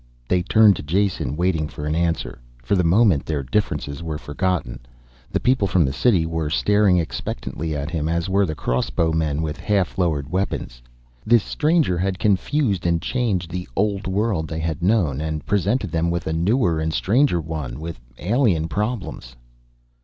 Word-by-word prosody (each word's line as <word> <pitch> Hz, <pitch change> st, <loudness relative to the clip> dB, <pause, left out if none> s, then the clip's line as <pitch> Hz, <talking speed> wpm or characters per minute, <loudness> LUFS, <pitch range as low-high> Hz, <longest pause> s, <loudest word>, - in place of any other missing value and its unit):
They 90 Hz, +5 st, +2 dB
turned 105 Hz, +2 st, +5 dB
to -, -, -5 dB
Jason, 80 Hz, -4 st, 0 dB
waiting 85 Hz, -3 st, +1 dB
for 75 Hz, -1 st, -7 dB
an 75 Hz, -, -1 dB
answer. 85 Hz, -4 st, -1 dB, 0.2 s
For -, -, -1 dB
the 90 Hz, -, +2 dB
moment 90 Hz, -2 st, +4 dB
their 75 Hz, -3 st, -2 dB
differences 70 Hz, -, -2 dB
were 80 Hz, -2 st, -4 dB
forgotten. 75 Hz, -3 st, -2 dB, 0.5 s
The -, -, 0 dB
people 125 Hz, -5 st, +2 dB
from 90 Hz, -3 st, +3 dB
the 65 Hz, -, -1 dB
city 90 Hz, -, +2 dB
were 80 Hz, -2 st, -2 dB
staring 100 Hz, +3 st, +3 dB
expectantly 80 Hz, -1 st, -3 dB
at 75 Hz, +2 st, -4 dB
him, 80 Hz, -2 st, -1 dB
as 85 Hz, +1 st, -1 dB
were 100 Hz, 0 st, +2 dB
the 80 Hz, -, -3 dB
crossbowmen 80 Hz, +4 st, 0 dB
with 75 Hz, -1 st, -3 dB
half 100 Hz, -3 st, 0 dB
lowered 75 Hz, -5 st, 0 dB
weapons. 90 Hz, -10 st, -3 dB, 0.4 s
This 115 Hz, -2 st, +4 dB
stranger 155 Hz, -, +1 dB
had 95 Hz, 0 st, -1 dB
confused 105 Hz, -, +1 dB
and 85 Hz, -1 st, +2 dB
changed 100 Hz, -7 st, -1 dB
the 90 Hz, -3 st, -5 dB
old 100 Hz, -1 st, 0 dB
world 95 Hz, -4 st, 0 dB
they 80 Hz, -, -5 dB
had 80 Hz, 0 st, -3 dB
known, 85 Hz, -, +1 dB
and 80 Hz, -1 st, -3 dB
presented 100 Hz, +1 st, 0 dB
them 85 Hz, +1 st, 0 dB
with 85 Hz, 0 st, -2 dB
a 80 Hz, -, -1 dB
newer 85 Hz, 0 st, +1 dB
and 80 Hz, 0 st, -1 dB
stranger 110 Hz, -, +2 dB
one, 75 Hz, -6 st, -5 dB
with 80 Hz, -5 st, -6 dB, 0.2 s
alien 95 Hz, -, +1 dB
problems. 100 Hz, -, -4 dB
85 Hz, 170 wpm, -22 LUFS, 80-100 Hz, 0.5 s, turned